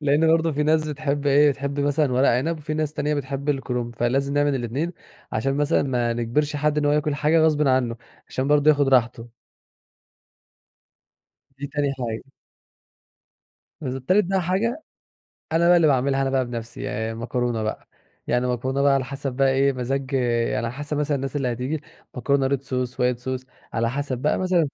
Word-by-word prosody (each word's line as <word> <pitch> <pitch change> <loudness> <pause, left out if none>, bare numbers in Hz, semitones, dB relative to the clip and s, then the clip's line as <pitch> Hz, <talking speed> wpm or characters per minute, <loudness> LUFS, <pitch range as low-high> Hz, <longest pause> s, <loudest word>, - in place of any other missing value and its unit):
لأن 150 +2 +3
برضو 165 0 +3
في 150 +1 0
ناس 155 0 +2
بتحب 145 -1 -2
إيه 145 +1 +5
بتحب 140 +1 -3
مثلًا 145 -1 +1
ورق 130 +2 +3
عنب، 155 +7 +1
وفي 155 +1 -4
ناس 155 -1 -1
تانية 150 0 -1
بتحب 140 +1 -4
الكرُنب، 125 -4 -2
فلازم 135 +4 0
نعمل 145 -1 +2
الاتنين 135 +8 -2 0.4
عشان 135 +5 0
مثلًا 145 +2 +2
ما 120 -4 0
نجبرش 145 +6 -1
حد 150 +1 +1
إن 150 - 0
هو 145 - +3
ياكل 150 0 +1
حاجة 150 +3 +2
غصبٍ 150 -2 +3
عنُّه، 125 -3 +1 0.3
عشان 130 +2 -2
برضو 150 0 +4
ياخد 145 -2 +2
راحته. 120 -2 +2 2.3
دي 140 - -4
تاني 145 -2 0
حاجة. 120 +2 -5 1.5
بالض 130 -2 -4
تالت 190 +5 +4
بقى 190 0 0
حاجة، 230 - -1 0.7
أنا 170 +1 +3
بقى 175 - +7
اللي 170 - +4
باعملها 135 -1 +2
أنا 135 - 0
بقى 130 -1 +1
بنَفسي 120 -1 -7
ي 110 +1 -3
المكرونة 115 0 -2
بقى، 110 - -4 0.4
يعني 125 +1 +1
مكرونة 130 +2 -1
بقى 140 -1 +5
على 135 -2 +1
حسب 140 0 -4
بقى 135 +1 +2
إيه 135 +1 +3
مزاج 135 +2 -3
يعني 120 -4 +1
على 115 - -4
حسب 145 +2 -4
مثلًا 150 0 0
الناس 135 +1 -4
اللي 130 -4 0
هتيجي، 130 +6 -3 0.3
مكرونة 135 +1 +1
red 140 -1 0
sauce، 125 -2 -2
white 125 -1 0
sauce، 130 -1 -3 0.3
على 115 0 0
حسب 135 -2 -3
بقى 150 +4 +1
مثلًا 180 -5 +2
140 Hz, 180 wpm, -23 LUFS, 125-150 Hz, 2.3 s, بقى